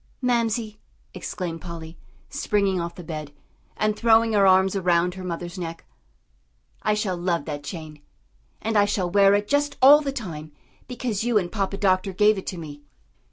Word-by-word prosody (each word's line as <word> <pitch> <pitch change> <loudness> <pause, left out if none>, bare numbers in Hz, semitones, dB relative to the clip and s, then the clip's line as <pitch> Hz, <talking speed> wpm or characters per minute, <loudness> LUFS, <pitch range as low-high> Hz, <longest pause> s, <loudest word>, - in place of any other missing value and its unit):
"Mamsie," 230 -3 -1 0.3
exclaimed 170 -4 -5
Polly, 165 -2 -8 0.3
springing 200 -3 0
off 170 0 -5
the 180 - -9
bed, 155 -3 -6 0.5
and 215 0 +1
throwing 225 0 +4
her 200 -2 +4
arms 190 +1 +4
around 180 -2 +2
her 185 0 -8
mother's 175 +1 -5
neck, 165 -1 -6 1.0
"I 215 - +1
shall 205 -3 -1
love 175 -1 -1
that 145 -2 -5
chain, 155 -1 -8 0.6
and 225 0 -1
I 205 - +5
shall 185 -3 -1
wear 200 +1 +5
it 205 0 -1
just 290 0 0
all 285 +3 +8
the 280 -2 -2
time 160 - -7 0.3
because 240 -5 -3
you 240 -2 +2
and 180 -4 -1
Papa 200 -2 -2
Doctor 190 0 +1
gave 210 +2 +3
it - - -11
to 185 - -4
me." 150 -3 -9
190 Hz, 170 wpm, -24 LUFS, 170-215 Hz, 1.0 s, all